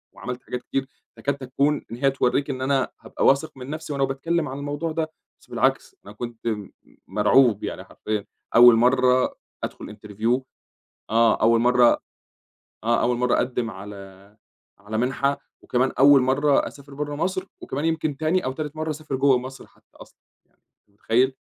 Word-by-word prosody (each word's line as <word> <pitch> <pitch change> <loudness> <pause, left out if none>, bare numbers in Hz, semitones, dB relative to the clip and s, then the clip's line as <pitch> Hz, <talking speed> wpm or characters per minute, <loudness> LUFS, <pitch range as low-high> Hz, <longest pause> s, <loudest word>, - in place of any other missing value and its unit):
وعملت 125 0 -6
حاجات 125 0 -5
كتير، 135 -1 -2 0.3
فكاد 140 0 -1
تكون 140 +3 0
إن 115 - -5
هي 135 +1 +2
توريك 135 +2 0
إن 130 -1 -3
أنا 135 0 +1
هابقى - - -3
واثق 140 +3 +3
من 130 +1 -8
نَفْسي 155 0 -5
وأنا 140 -1 0
باتكلّم 150 +5 -1
عن 135 - -6
الموضوع 145 +3 -3
ده، 160 0 -2 0.3
بس - - -22
بالعكس - - 0
أنا 100 - -11
كُنت 120 +1 -7
م 105 -3 -3 0.4
مرعوب 105 +3 +3
يعني - - -5
حرفيًا، 105 -2 -4 0.3
أول 120 0 +9
مرّه 125 +2 +3 0.3
أدخل 105 - -6
interview، 110 +5 -1 0.7
آه 115 0 +3
أول 115 +1 +5
مرّه 125 0 +4 0.8
آه 115 +1 +2
أول 120 0 +1
مرّه 125 0 +1
أقدّم 125 -2 -1
على، 100 +1 -11 0.4
على 105 +2 -5
منحة، 135 +4 0 0.2
وكمان 130 +2 +1
أول 140 0 +7
مرّه 135 +3 +2
أسافر 140 0 -12
برّه 145 +1 -4
مصر 185 +4 -2 0.2
وكمان 145 +4 -4
يمكن 155 -3 -1
تاني 160 +5 0
أو 130 - -1
تالت 150 +2 -5
مرّه 155 0 -3
أسافر 155 -2 -4
جوّه 135 -1 +4
مصر 130 +2 -8
حتى - - -27
أصلًا، - - -15 0.3
يع - - -40
أنت - - -42 0.3
متخيّل؟ 120 +6 +1
130 Hz, 170 wpm, -24 LUFS, 115-145 Hz, 0.8 s, أول